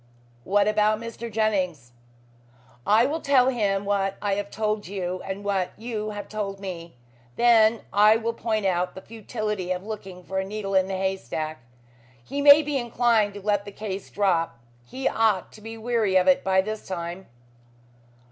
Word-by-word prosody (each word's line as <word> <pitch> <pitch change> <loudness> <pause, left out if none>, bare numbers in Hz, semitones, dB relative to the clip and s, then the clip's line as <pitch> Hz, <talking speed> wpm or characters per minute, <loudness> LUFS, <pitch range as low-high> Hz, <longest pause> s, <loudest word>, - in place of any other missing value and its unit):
"What 200 +1 +3
about 215 0 +2
Mr. 230 0 -7
Jennings?" 185 - -1 1.0
"I 220 +3 +5
will 310 +4 -2
tell 265 -2 +4
him 205 -5 0
what 195 -1 0
I 205 -1 -1
have 200 0 -3
told 215 -1 -2
you, 185 -1 -4
and 195 +1 -5
what 195 -3 -1
you 220 -2 -4
have 205 -1 -6
told 200 -2 -4
me. 170 -5 -7 0.4
Then 230 -2 +5
I 210 +2 +6
will 230 +1 -1
point 220 -3 -2
out 180 -1 0
the 190 - -8
futility 215 -4 -4
of 185 +1 -3
looking 195 -4 -7
for 190 +2 -3
a - - -1
needle 200 0 -5
in 190 0 +3
a 190 - -2
haystack. 160 -5 -3 0.6
He 280 - -4
may 290 +1 +8
be 290 -1 -1
inclined 230 -4 +1
to 205 - -9
let 205 -1 +1
the 205 - -9
case 200 -2 -6
drop. 180 -8 0 0.3
He 265 - -3
ought 220 -5 +1
to 215 - -15
be 225 +1 -8
weary 225 -4 0
of 185 0 +4
it 185 - +4
by 190 0 +3
this 215 +2 -6
time." 175 0 -5
205 Hz, 175 wpm, -25 LUFS, 190-220 Hz, 1.0 s, may